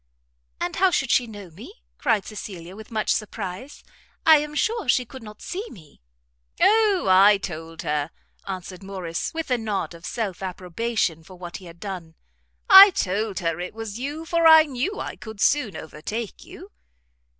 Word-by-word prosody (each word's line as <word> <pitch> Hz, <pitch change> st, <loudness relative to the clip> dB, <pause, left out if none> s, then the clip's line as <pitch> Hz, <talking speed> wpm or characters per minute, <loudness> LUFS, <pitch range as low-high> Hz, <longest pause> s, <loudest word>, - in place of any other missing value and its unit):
"And -, -, -3 dB
how 380 Hz, +1 st, +5 dB
should 270 Hz, -7 st, 0 dB
she 245 Hz, -, +3 dB
know 205 Hz, -5 st, -10 dB
me?" 240 Hz, -, -12 dB, 0.2 s
cried 225 Hz, -7 st, +1 dB
Cecilia, 190 Hz, -4 st, -8 dB
with 220 Hz, +1 st, -11 dB
much 220 Hz, -2 st, 0 dB
surprise; 215 Hz, +4 st, -6 dB, 0.4 s
"I 315 Hz, -1 st, +8 dB
am 300 Hz, 0 st, -5 dB
sure 440 Hz, -, -1 dB
she 250 Hz, +1 st, +3 dB
could 260 Hz, +2 st, -11 dB
not 210 Hz, -1 st, -12 dB
see 380 Hz, +3 st, -4 dB
me." 155 Hz, -, -16 dB, 0.6 s
"O, 425 Hz, -3 st, +4 dB
I 195 Hz, +2 st, +7 dB
told 165 Hz, -2 st, -7 dB
her,", 150 Hz, -1 st, -1 dB, 0.4 s
answered 185 Hz, -1 st, -6 dB
Morrice, 185 Hz, -4 st, -4 dB
with 325 Hz, -4 st, -5 dB
a 250 Hz, -, +2 dB
nod 210 Hz, -5 st, -3 dB
of 170 Hz, 0 st, -14 dB
self 205 Hz, -7 st, -4 dB
approbation 185 Hz, -1 st, -2 dB
for 185 Hz, +3 st, -14 dB
what 175 Hz, -1 st, -8 dB
he 190 Hz, -, -14 dB
had 170 Hz, 0 st, -13 dB
done, 180 Hz, -5 st, -7 dB, 0.5 s
"I 385 Hz, +1 st, +11 dB
told 205 Hz, -, -2 dB
her 165 Hz, -1 st, -1 dB
it 180 Hz, +4 st, -6 dB
was 225 Hz, -1 st, -6 dB
you, 295 Hz, +5 st, -5 dB
for 335 Hz, 0 st, +3 dB
I 320 Hz, -1 st, +9 dB
knew 305 Hz, -, -3 dB
I -, -, -5 dB
could 220 Hz, -2 st, -10 dB
soon 250 Hz, -4 st, +2 dB
overtake 205 Hz, +9 st, -6 dB
you." -, -, -13 dB
210 Hz, 170 wpm, -24 LUFS, 180-270 Hz, 0.6 s, I